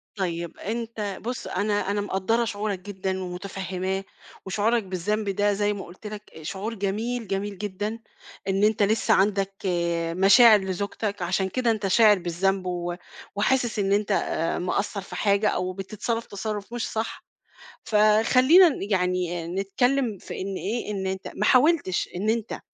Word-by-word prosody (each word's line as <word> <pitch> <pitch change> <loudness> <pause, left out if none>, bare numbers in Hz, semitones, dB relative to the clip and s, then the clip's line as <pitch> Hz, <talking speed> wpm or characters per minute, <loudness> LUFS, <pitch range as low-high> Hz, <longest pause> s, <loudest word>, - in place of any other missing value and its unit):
طيب 170 -4 -3
أنت 220 -2 -4
بُص، 245 +3 -4
أنا 205 -1 0
أنا 205 - 0
مقدّرة 205 +4 0
شعورك 205 -3 -3
جدًا 190 -1 -4
ومُتفهِّماه 190 +1 -4 0.4
وشعورك 215 +4 +1
بالذنب 200 +3 -2
ده 205 +1 +1
زي 205 +1 +1
ما 200 - -6
قُلت 185 +5 -11
لك 210 -5 -9
شعور 195 +8 -4
جميل، 220 +3 -2
جميل 200 +1 -3
جدًا 210 +3 -4 0.5
إن 195 +1 +1
أنت 215 -1 +3
لسّه 215 +2 +3
عندك 195 0 +2 0.6
مشاعر 215 +3 +7
لزوجتك 200 +2 -3
عشان 185 +2 0
كده 245 0 +1
أنت 215 -3 -1
شاعر 210 0 +5
بالذنب 185 +2 0
و 175 -1 -2 0.4
وحاسِس 240 +2 +1
إن 195 -1 +1
أنت 205 +1 +1 0.5
مِقصّر 200 +3 -1
في 195 - -9
حاجة 200 +1 +2
أو 185 +1 -2
بتتصرّف 215 +4 -3
تَصرُّف 210 +2 -5
مش 240 - -2
صح، 220 +1 -4 0.6
فخلّينا 230 - +6
ن 300 - -4
يعني 180 -3 0
نتكلّم 210 +5 0
في - - -7
إن 195 +1 -3
إيه، 220 +3 -3
إن 195 -2 -3
أنت 190 0 -3
ما 210 - -1
حاولتش 280 - +3
إن 210 +4 0
أنت 230 0 -2
205 Hz, 150 wpm, -25 LUFS, 190-220 Hz, 0.6 s, مشاعر